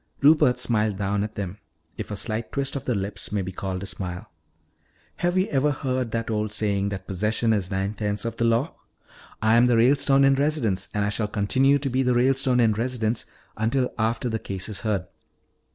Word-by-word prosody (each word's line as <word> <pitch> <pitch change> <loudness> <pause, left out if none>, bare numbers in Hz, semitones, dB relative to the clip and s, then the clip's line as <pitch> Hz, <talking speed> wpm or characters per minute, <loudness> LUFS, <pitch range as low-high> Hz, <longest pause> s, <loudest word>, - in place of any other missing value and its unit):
Rupert 145 -4 +5
smiled 110 -4 0
down 100 0 0
at 110 +1 -6
them, 100 0 -5 0.4
if - - -6
a 105 - -3
slight 110 +2 -3
twist 140 0 -2
of 135 - -4
the 125 - 0
lips 100 0 -4
may 100 -2 -1
be 90 - -5
called 95 0 -4
a - - -4
smile. 95 +2 -5 0.9
"Have 175 +1 0
you 185 - +3
ever 140 +1 +2
heard 130 -3 -2
that 115 0 -3
old 105 -1 -1
saying 100 -2 0
that 95 -2 -6
'possession 105 +4 +1
is 100 -4 -1
nine 95 +1 -1
points 105 0 -3
of 115 -1 -3
the - - 0
law'? 115 +7 +1 0.7
I 110 +1 +5
am 120 +1 +5
the 120 -2 +3
Ralestone 135 +3 +4
in 135 0 +5
residence, 135 -10 0
and 105 0 +1
I - - 0
shall 105 0 0
continue 130 +7 +2
to 140 -1 -2
be 130 +2 +1
the 125 -1 +2
Ralestone 130 0 +2
in 115 -2 +4
residence 115 0 -1 0.3
until 125 +4 0
after 115 +3 0
this 110 -2 -2
case 95 +1 -4
is 105 - -5
heard. 100 -5 -1
110 Hz, 205 wpm, -25 LUFS, 100-130 Hz, 0.9 s, Rupert